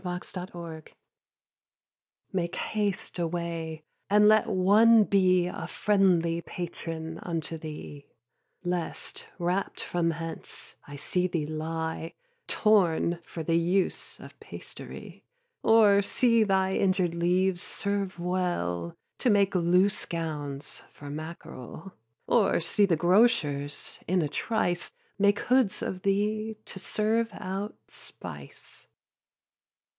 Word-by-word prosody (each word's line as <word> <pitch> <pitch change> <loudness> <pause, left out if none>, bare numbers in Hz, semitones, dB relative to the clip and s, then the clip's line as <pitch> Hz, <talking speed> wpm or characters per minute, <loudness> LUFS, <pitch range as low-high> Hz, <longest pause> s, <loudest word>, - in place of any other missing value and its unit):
4. 180 -1 -3
TO - - -12
HIS 180 - -4
BOOK 165 -3 -9 1.4
Make 175 -2 -1
haste 205 -4 -2
away, 165 -2 -3 0.3
and 210 +1 +6
let 215 0 +5
one 215 +4 +6
be 185 -3 +3
A 180 - -5
friendly 180 -5 +2
patron 165 -2 -6
unto 165 -2 -3
thee; 150 -2 -8 0.6
Lest, 175 -2 -3
rapt 180 +3 -1
from 170 -1 0
hence, 165 0 -6
I 145 - -8
see 180 +5 0
thee 170 -4 -2
lie 160 +1 -4 0.3
Torn 175 -5 +3
for 165 -1 -7
the 165 +1 +1
use 180 +3 0
of - - -13
pastery; - - -9 0.4
Or 215 -3 +6
see 230 +2 +3
thy 190 -2 +2
injured 185 -3 +2
leaves 180 +2 +1
serve 200 -2 -2
well 175 - -2 0.2
To 250 - +2
make 200 -2 +4
loose 180 +2 +3
gowns 150 -4 -5
for 145 -1 -9
mackarel; 160 +1 -8 0.3
Or 215 -5 +3
see 200 +4 +2
the 170 - +3
grocers, 155 -6 +2
in 180 -1 +2
a - - 0
trice, 175 +1 -1 0.3
Make 200 0 +3
hoods 250 -6 +2
of 185 - -3
thee 215 +3 0
to 190 - -8
serve 220 +4 0
out 195 +3 -4
spice. - - -10
180 Hz, 115 wpm, -28 LUFS, 165-200 Hz, 1.4 s, and